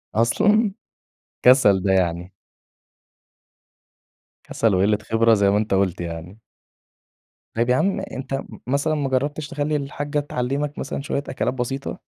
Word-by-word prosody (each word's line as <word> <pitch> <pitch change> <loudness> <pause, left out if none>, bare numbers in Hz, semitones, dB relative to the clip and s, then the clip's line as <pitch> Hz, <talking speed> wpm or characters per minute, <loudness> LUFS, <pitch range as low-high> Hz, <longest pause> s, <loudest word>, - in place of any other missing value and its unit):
أصلًا؟! 205 - +3 0.7
كسل 115 -7 +5
ده 95 0 +2
يعني. 90 0 0 2.1
كسَل 110 -4 +1
وقِلّة 100 +3 +3
خبرة 115 0 +4
زي 100 -2 +3
ما 100 - +3
أنت 105 -1 -1
قُلت 95 -2 +1
يعني. 85 +5 -7 1.1
طيب 115 +2 0
يا 125 - +4
عم 195 +8 +1
أنت 135 -8 -6
م 135 - -5
مثلًا 140 +4 +1
ما 145 -3 -1
جرّبتش 145 +3 -1
تخلّي 150 -2 -2
الحاجّة 145 +1 -2
تعلّمك 140 +1 -3
مثلًا 140 - -4
شوية 140 0 -2
أكلات 130 - -1
بسيطة؟ 135 +2 -4
130 Hz, 135 wpm, -22 LUFS, 100-145 Hz, 2.1 s, كسل